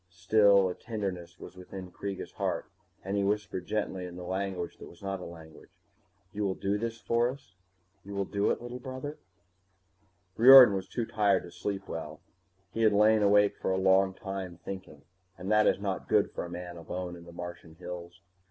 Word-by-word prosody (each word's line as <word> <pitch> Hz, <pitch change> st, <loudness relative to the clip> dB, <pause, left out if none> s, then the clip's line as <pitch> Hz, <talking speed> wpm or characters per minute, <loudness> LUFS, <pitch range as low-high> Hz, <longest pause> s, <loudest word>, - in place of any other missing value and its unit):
Still, 100 Hz, +2 st, +4 dB
a 90 Hz, -, -2 dB
tenderness 90 Hz, -7 st, -5 dB
was -, -, -11 dB
within 90 Hz, 0 st, -9 dB
Kreega's 100 Hz, 0 st, -6 dB
heart, -, -, -2 dB, 0.4 s
and 95 Hz, +2 st, -3 dB
he 100 Hz, -, +1 dB
whispered 100 Hz, -3 st, -2 dB
gently 95 Hz, -4 st, -2 dB
in 90 Hz, -, -10 dB
the 90 Hz, -, -7 dB
language 95 Hz, -1 st, -3 dB
that -, -, -10 dB
was 85 Hz, -, -17 dB
not 95 Hz, -1 st, -3 dB
a -, -, -7 dB
language, 80 Hz, -2 st, -12 dB, 0.6 s
You 105 Hz, +1 st, -2 dB
will 95 Hz, -2 st, 0 dB
do 100 Hz, +1 st, -1 dB
this 115 Hz, 0 st, -4 dB
for 120 Hz, +1 st, +1 dB
us? 135 Hz, -5 st, -10 dB, 0.5 s
You 100 Hz, +1 st, -8 dB
will 100 Hz, 0 st, 0 dB
do 100 Hz, +1 st, 0 dB
it, -, -, -1 dB
little 120 Hz, +1 st, -6 dB
brother? 130 Hz, +4 st, -6 dB, 1.2 s
Riordan 125 Hz, -2 st, +10 dB
was 95 Hz, -1 st, -3 dB
too 120 Hz, -, -3 dB
tired 105 Hz, -3 st, +2 dB
to 85 Hz, -, -11 dB
sleep 95 Hz, +2 st, -4 dB
well. 80 Hz, -2 st, -6 dB, 0.5 s
He 115 Hz, -, -3 dB
had 110 Hz, -2 st, +5 dB
lain 105 Hz, +1 st, +5 dB
awake 105 Hz, 0 st, +4 dB
for -, -, -2 dB
a 95 Hz, -, +1 dB
long 95 Hz, 0 st, +3 dB
time, 95 Hz, -3 st, -6 dB
thinking, 95 Hz, -1 st, -8 dB, 0.3 s
and 95 Hz, +4 st, -4 dB
that 105 Hz, 0 st, +5 dB
is -, -, +3 dB
not 100 Hz, -2 st, -3 dB
good -, -, +3 dB
for -, -, -4 dB
a -, -, -8 dB
man 90 Hz, 0 st, -7 dB
alone 90 Hz, +1 st, -5 dB
in 85 Hz, -1 st, -12 dB
the 85 Hz, -, -11 dB
Martian 85 Hz, -2 st, -8 dB
hills. 90 Hz, 0 st, -8 dB
95 Hz, 195 wpm, -29 LUFS, 90-105 Hz, 1.2 s, Riordan